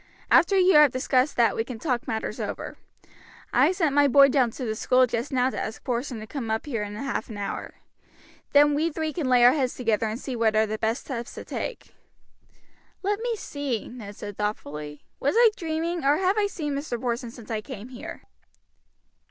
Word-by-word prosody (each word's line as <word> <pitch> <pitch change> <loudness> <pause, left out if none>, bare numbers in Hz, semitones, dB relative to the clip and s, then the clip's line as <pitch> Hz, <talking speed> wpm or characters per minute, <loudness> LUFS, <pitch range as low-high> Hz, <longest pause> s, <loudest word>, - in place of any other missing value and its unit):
After 395 - +5
you 370 0 +5
have 300 -1 +8
discussed 255 +1 +1
that 235 -2 +3
we 225 - 0
can 235 0 -7
talk 250 -1 -2
matters 220 0 -3
over. - - -5 0.8
I - - +5
sent 330 -6 0
my 290 0 +5
boy 275 +1 +7
down 255 -3 +3
to 250 +3 -6
the 220 - -1
school 255 +3 +3
just 240 +3 -3
now 255 0 +2
to - - -4
ask 220 - -5
Porson 245 -1 -3
to - - -7
come 235 -1 -5
up 220 0 -1
here 240 -7 -3
in 205 0 -5
half 275 +3 -3
an 215 - -7
hour. 200 -1 -5 0.8
Then 290 0 +6
we 315 +3 +1
three 315 0 -3
can 290 -5 -2
lay 245 -1 +6
our 245 - +9
heads 265 -4 -1
together 225 -3 0
and 220 +2 -4
see 265 -2 -5
what 225 -2 +2
are 220 0 +4
the 215 0 -4
best 225 +3 0
steps 240 -4 -6
to - - -8
take." - - -6 1.1
"Let 405 +2 0
me 470 0 -1
see," 285 - -4
Ned 215 -4 -9
said 205 -1 -8
thoughtfully. 150 -8 -4 0.2
"Was 280 +8 0
I 470 -2 +7
dreaming, 330 0 -2
or 285 +2 +4
have 380 +1 +2
I 420 -1 +2
seen 310 -7 -4
Mr. 280 -4 -3
Porson 240 -1 -2
since 230 -1 -11
I 215 -1 -1
came 235 -1 -9
here?" 300 +7 -9
255 Hz, 210 wpm, -25 LUFS, 225-295 Hz, 1.1 s, our